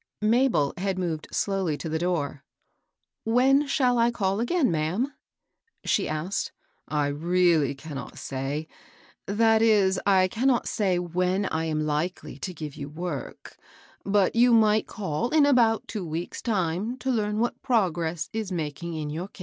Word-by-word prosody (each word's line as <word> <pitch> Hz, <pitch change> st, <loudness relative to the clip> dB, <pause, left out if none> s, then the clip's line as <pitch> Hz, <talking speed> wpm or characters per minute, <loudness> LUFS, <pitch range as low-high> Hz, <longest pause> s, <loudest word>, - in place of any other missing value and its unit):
Mabel 225 Hz, -, +3 dB
had 190 Hz, 0 st, -1 dB
moved 165 Hz, -4 st, -3 dB
slowly 190 Hz, -7 st, -1 dB
to 165 Hz, -, -6 dB
the 160 Hz, 0 st, -1 dB
door. 160 Hz, -6 st, -2 dB, 0.4 s
" -, -, -56 dB
When 270 Hz, +3 st, +4 dB
shall 250 Hz, -3 st, +2 dB
I 230 Hz, +1 st, +4 dB
call 200 Hz, -4 st, -1 dB
again, 260 Hz, -, +1 dB
ma'am? 175 Hz, -, -1 dB, 0.3 s
" 460 Hz, -, -39 dB
she -, -, +1 dB
asked. 155 Hz, +6 st, -2 dB, 0.4 s
"I 150 Hz, -1 st, 0 dB
really 160 Hz, -1 st, +2 dB
cannot 140 Hz, -1 st, -8 dB
say, 140 Hz, +4 st, -4 dB, 0.3 s
— -, -, -29 dB
that 220 Hz, +2 st, +3 dB
is, 200 Hz, -4 st, +3 dB
I 190 Hz, -2 st, +5 dB
cannot 245 Hz, +6 st, +1 dB
say 190 Hz, -5 st, +1 dB
when 180 Hz, +3 st, 0 dB
I 160 Hz, -3 st, -1 dB
am 155 Hz, -1 st, -1 dB
likely 155 Hz, +5 st, -3 dB
to 185 Hz, -, -4 dB
give 155 Hz, -4 st, -7 dB
you 140 Hz, -, -6 dB
work; 155 Hz, -2 st, -6 dB, 0.5 s
but 200 Hz, 0 st, +2 dB
you 240 Hz, +1 st, +5 dB
might 215 Hz, -1 st, +3 dB
call 205 Hz, +2 st, -3 dB
in 305 Hz, -1 st, +4 dB
about 235 Hz, -5 st, +3 dB
two 215 Hz, -4 st, -4 dB
weeks' 165 Hz, +1 st, -5 dB
time 200 Hz, +2 st, -1 dB
to 265 Hz, 0 st, -2 dB
learn 210 Hz, -3 st, 0 dB
what 235 Hz, +2 st, -1 dB
progress 175 Hz, -8 st, 0 dB
is 220 Hz, -3 st, -3 dB
making 165 Hz, 0 st, -4 dB
in 150 Hz, -1 st, -4 dB
your 170 Hz, +5 st, -4 dB
case." 200 Hz, -, -19 dB
185 Hz, 165 wpm, -26 LUFS, 160-225 Hz, 0.5 s, I